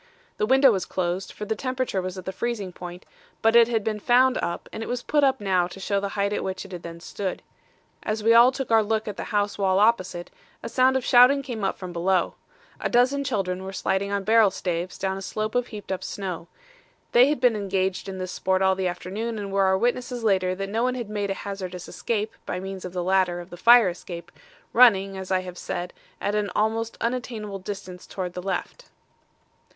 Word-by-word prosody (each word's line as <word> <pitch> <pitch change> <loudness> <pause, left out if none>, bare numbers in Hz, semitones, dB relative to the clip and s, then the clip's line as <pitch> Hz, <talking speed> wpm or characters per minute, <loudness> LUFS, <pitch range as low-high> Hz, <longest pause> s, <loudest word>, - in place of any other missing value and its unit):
The 210 - 0
window 265 +1 +6
was 190 -4 -1
closed, 185 +1 -2
for 210 - -7
the 220 +1 -1
temperature 255 -5 -2
was 185 +1 -5
at 185 - -8
the 190 - -3
freezing 205 -3 -3
point, 175 0 -9 0.4
but 225 +1 +4
it 235 -1 +8
had 225 -3 0
been 215 -1 -2
found 250 +4 +4
up, 170 - -3
and 220 - -5
it - - -5
was 245 0 -2
put 295 -1 +2
up 270 -1 +3
now 185 -3 +1
to 180 +2 -11
show 200 +1 0
the 200 0 -3
height 200 +1 +1
at - - -2
which 190 0 -4
it 195 - -12
had 175 -2 -6
then 170 -1 -8
stood. 190 +2 -5 0.6
As 215 0 -3
we 230 +1 +5
all 240 +2 +8
took 270 -2 -5
our 225 -1 +6
look 220 +1 -1
at 210 - -4
the - - -5
house 205 -1 -1
wall 190 -1 +2
opposite, 185 -5 +1 0.3
a - - -4
sound 260 +1 +3
of 255 - -4
shouting 255 +3 +6
came 240 -6 -5
up 195 - 0
from 185 -2 -7
below. 175 +1 +1 0.5
A - - -1
dozen 255 +4 +3
children 190 -8 -2
were 190 - -6
sliding 195 +1 -1
on 200 -1 -1
barrel 220 0 +5
staves 180 -1 -3
down 190 0 -2
a - - -6
slope 215 +2 -3
of 245 0 0
heaped 210 -4 -8
up 190 - -3
snow. 180 -4 -5 0.6
They 245 +2 +6
had 295 -1 0
been 245 -2 +4
engaged 195 -1 -1
in 190 - -6
this 185 0 -4
sport 190 0 0
all 190 0 +4
the 190 -1 -1
afternoon 200 +6 -4
and 200 -1 -5
were 195 0 +3
our 190 0 +3
witnesses 245 +2 -1
later 185 -3 +2
that 195 +1 -4
no 225 +3 -1
one 250 +1 +1
had 235 -4 -5
made 205 -1 -2
a 195 - -1
hazardous 185 -3 -6
escape 220 -1 -2
by 180 - -2
means 190 0 -6
of 180 - -7
the 180 -1 -2
ladder 185 -1 +2
of 175 +1 -10
the - - -7
fire 230 +3 +6
escape, 175 -1 -8 0.4
running, 195 -5 +5
as 190 -1 -7
I 185 -1 +2
have 180 -1 -8
said, 175 0 -4 0.3
at 205 - -1
an 210 -1 0
almost 225 +1 0
unattainable 230 -4 -3
distance 185 -2 -7
towards 180 -2 -5
the 180 - -5
left. 195 - -4
200 Hz, 230 wpm, -25 LUFS, 185-230 Hz, 0.6 s, it